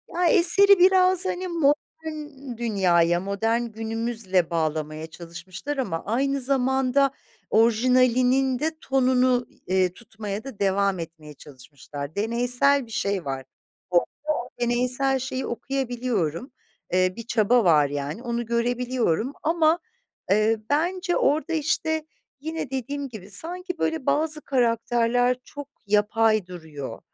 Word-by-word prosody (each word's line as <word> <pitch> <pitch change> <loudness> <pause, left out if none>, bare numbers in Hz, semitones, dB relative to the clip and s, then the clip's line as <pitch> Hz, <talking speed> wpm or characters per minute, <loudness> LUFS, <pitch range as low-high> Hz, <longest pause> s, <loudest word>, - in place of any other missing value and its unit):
Ya, 355 +1 +1
eseri 395 +2 +6
biraz 370 0 +5
hani 370 0 -2
modern 300 -4 -3
dünyaya, 175 -7 +2
modern 200 +5 -1
günümüzle 225 -5 -2
bağlamaya 155 -1 -2
çalışmışlar 175 - -8
ama 190 -11 -3
aynı 275 +5 0
zamanda 265 +1 +1 0.4
orijinalinin 250 +3 +3
de 315 +3 0
tonunu, 255 -2 +2 0.2
eee, 185 -1 +1
tutmaya 210 -1 -7
da 270 -7 -10
devam 195 -1 +1
etmeye 160 -2 -9
çalışmışlar. 140 +2 -10
Deneysel 245 +6 +3
bir 225 - -16
şey 200 -5 -2
var, 135 -1 -4 0.4
orada 175 -1 +3 0.3
o 245 - -5
deneysel 250 +3 +1
şeyi 260 0 -4
okuyabiliyorum, 245 - -3 0.4
eee, 185 0 +2
bir 230 - -7
çaba 235 +1 +3
var 150 -5 +4
yani 145 - -5
onu 235 -1 -3
görebiliyorum 240 - -1
ama, 325 +1 +2 0.5
eee, 215 +2 +3
bence 350 +5 0
orada, 310 +4 +1
işte, 315 0 0 0.3
yine 320 -1 -5
dediğim 275 +2 -4
gibi 205 -3 -11
sanki 360 - 0
böyle 320 -4 -2
bazı 310 0 +1
karakterler 245 -1 +1
çok 285 0 -10 0.2
yapay 215 0 +2
duruyor. 155 -9 -8
240 Hz, 115 wpm, -24 LUFS, 195-275 Hz, 0.5 s, eseri